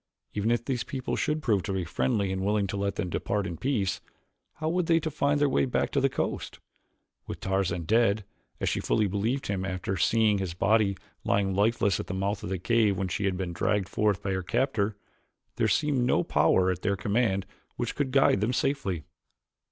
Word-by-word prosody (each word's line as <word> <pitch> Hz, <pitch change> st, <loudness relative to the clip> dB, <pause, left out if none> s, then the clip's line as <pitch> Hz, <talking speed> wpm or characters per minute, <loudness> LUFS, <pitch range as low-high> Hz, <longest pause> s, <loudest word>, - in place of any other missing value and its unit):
Even 105 Hz, +2 st, 0 dB
if 120 Hz, 0 st, +1 dB
these 125 Hz, -4 st, -1 dB
people 130 Hz, -2 st, -3 dB
should 155 Hz, 0 st, -1 dB
prove 105 Hz, -8 st, +2 dB, 0.3 s
friendly 100 Hz, 0 st, 0 dB
and 95 Hz, 0 st, -2 dB
willing 105 Hz, 0 st, +1 dB
to 100 Hz, -, -4 dB
let 100 Hz, 0 st, -1 dB
them -, -, -2 dB
depart 100 Hz, +3 st, -1 dB
in 85 Hz, -, -4 dB
peace, 105 Hz, -, -1 dB, 0.5 s
how 155 Hz, -, -4 dB
were 175 Hz, +3 st, +2 dB
they 165 Hz, -1 st, +3 dB
to 160 Hz, 0 st, -3 dB
find 145 Hz, 0 st, +1 dB
their 145 Hz, -, +4 dB
way 70 Hz, -, +2 dB
back 65 Hz, -, 0 dB
to -, -, +1 dB
the -, -, +3 dB
coast? -, -, -3 dB, 0.7 s
With -, -, -6 dB
Tarzan 95 Hz, -3 st, -1 dB
dead, 110 Hz, +1 st, +2 dB, 0.3 s
as -, -, -1 dB
she -, -, 0 dB
fully 110 Hz, -, +1 dB
believed 105 Hz, +7 st, -1 dB
him 95 Hz, -2 st, -2 dB
after 95 Hz, 0 st, -3 dB
having 95 Hz, -2 st, -1 dB
seen 110 Hz, -2 st, +3 dB
his 90 Hz, -3 st, -3 dB
body 100 Hz, 0 st, +2 dB, 0.3 s
lying 100 Hz, -1 st, +1 dB
lifeless 100 Hz, -1 st, +2 dB
at -, -, -5 dB
the 95 Hz, -, -4 dB
mouth 100 Hz, +2 st, -1 dB
of -, -, -5 dB
the 95 Hz, -, -1 dB
cave 105 Hz, +1 st, +2 dB
when 95 Hz, 0 st, -2 dB
she 100 Hz, -, -2 dB
had 95 Hz, -2 st, 0 dB
been 90 Hz, -2 st, -3 dB
dragged 95 Hz, +2 st, 0 dB
forth 105 Hz, -2 st, +1 dB
by 100 Hz, -, -1 dB
her 95 Hz, 0 st, -1 dB
captor, 110 Hz, 0 st, 0 dB, 0.6 s
there -, -, +2 dB
seemed 145 Hz, -5 st, +1 dB
no 125 Hz, -, +2 dB
power 95 Hz, 0 st, +3 dB
at 90 Hz, -1 st, -4 dB
their 100 Hz, -, +1 dB
command 100 Hz, -1 st, +1 dB, 0.3 s
which 120 Hz, -, -2 dB
could 145 Hz, -2 st, -1 dB
guide 135 Hz, -7 st, +4 dB
them 115 Hz, +4 st, +1 dB
safely. 110 Hz, -, -1 dB
100 Hz, 205 wpm, -28 LUFS, 95-120 Hz, 0.7 s, their